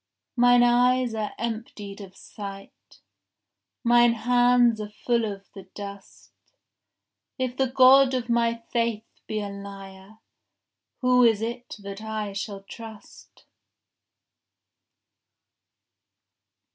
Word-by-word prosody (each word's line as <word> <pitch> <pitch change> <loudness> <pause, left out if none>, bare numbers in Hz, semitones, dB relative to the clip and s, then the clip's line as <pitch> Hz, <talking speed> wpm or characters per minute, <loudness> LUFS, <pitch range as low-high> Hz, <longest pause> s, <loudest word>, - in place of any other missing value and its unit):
Mine 245 0 +5
eyes 245 0 +3
are 215 -2 -4
emptied 215 -3 -6
of 190 -2 -12
sight, 195 -2 -11 0.8
Mine 240 -1 +5
hands 245 -1 +3
are 210 - -6
full 235 +2 -1
of 195 0 -10
the 195 -2 -11
dust. 200 -1 -10 1.1
If 255 -1 -2
the 265 0 +1
God 260 +1 +6
of 245 -2 -3
my 235 -1 0
faith 230 -2 0 0.2
be 215 -1 -3
a 205 - -5
liar, 200 0 -11 0.8
Who 250 -1 +4
is 225 -2 +3
it 240 +2 -5
that 200 +1 -7
I 215 -2 -4
shall 200 0 -6
trust? 220 +1 -13
225 Hz, 105 wpm, -25 LUFS, 200-245 Hz, 1.1 s, God